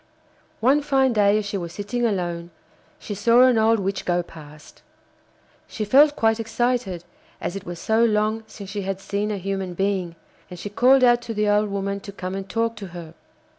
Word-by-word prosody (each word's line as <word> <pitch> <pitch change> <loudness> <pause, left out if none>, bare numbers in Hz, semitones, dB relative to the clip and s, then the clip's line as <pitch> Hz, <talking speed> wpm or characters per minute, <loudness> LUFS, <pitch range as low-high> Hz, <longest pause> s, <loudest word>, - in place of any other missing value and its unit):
One 270 +6 +4
fine 270 -3 +2
day 205 -1 +4
as 215 - -2
she 205 -1 -3
was 170 -1 -6
sitting 235 +5 -1
alone 175 -4 -3 0.5
she 210 - -7
saw 230 +5 +4
an 255 -3 +4
old 225 0 +3
witch 195 0 -2
go 175 0 0
past. 155 -2 -14 0.9
She 215 - -4
felt 290 +7 +5
quite 225 -2 +2
excited, 225 -5 -1 0.4
as 175 - -4
it 195 - -7
was 175 0 -6
so 220 +6 +1
long 215 0 +1
since 200 -2 -10
she 205 0 -3
had 195 0 -3
seen 200 +2 -3
a 210 - -2
human 190 -1 -4
being, 190 -3 -1 0.3
and 180 - -9
she 205 +4 -7
called 255 +5 +4
out 240 -1 +5
to 230 -2 -6
the 210 0 +1
old 210 0 +2
woman 200 0 -3
to 200 - -9
come 185 -1 -6
and 195 0 -6
talk 230 0 -1
to 200 -2 -7
her. 165 -2 -9
205 Hz, 200 wpm, -23 LUFS, 190-230 Hz, 0.9 s, felt